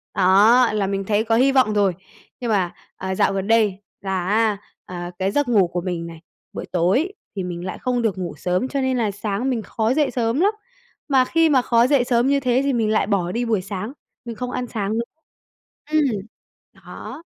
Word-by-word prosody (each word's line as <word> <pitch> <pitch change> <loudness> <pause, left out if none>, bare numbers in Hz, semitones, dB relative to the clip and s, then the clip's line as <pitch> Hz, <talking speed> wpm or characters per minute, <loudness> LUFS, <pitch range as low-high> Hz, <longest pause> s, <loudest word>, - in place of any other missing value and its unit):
đó, 210 +6 +5
là 200 -2 0
mình 195 0 -2
thấy 210 +1 +1
có 225 0 +1
hi 265 +3 +4
vọng 255 -6 +3
rồi, 200 -3 +2 0.5
nhưng 240 -2 -3
mà, 185 -4 +1 0.2
à, 190 0 -3
dạo 195 - +2
gần 195 +1 -2
đây 215 -4 +3 0.2
là 190 -2 -2
á, 215 0 +2 0.3
à, 175 -1 -6
cái 190 +1 0
giấc 290 +2 +1
ngủ 205 -7 +4
của 175 0 -3
mình 170 -2 -4
này, 165 -1 -11 0.3
buổi - - -5
tối 195 - +1 0.2
thì 190 - -3
mình 175 0 -5
lại 185 - -5
không 250 -1 -1
được 210 -4 0
ngủ 180 -2 -4
sớm, 180 +8 -1
cho 275 0 -2
nên 260 -1 0
là 220 -4 0
sáng 210 +5 -2
mình 235 -4 -1
khó 220 +4 -1
dậy 295 -2 +1
sớm 235 +3 0
lắm, 400 +4 +4 0.6
mà 265 -3 +4
khi 330 +3 +3
mà 265 -3 +4
khó 235 0 +3
dậy 280 -3 +3
sớm 245 +1 +2
như 280 0 +3
thế 255 0 +1
thì 275 -1 +1
mình 225 -3 +1
lại 215 -2 +1
bỏ 185 -4 0
đi 240 +2 -1
buổi 220 -5 +1
sáng, 205 +6 -5 0.3
mình 235 -1 -6
không 250 +1 -5
ăn 245 0 -3
sáng 215 -1 -2
nữ 230 - 0 0.9
ừm, 310 0 +4 0.7
đó. - - -10
220 Hz, 220 wpm, -21 LUFS, 190-250 Hz, 0.9 s, đó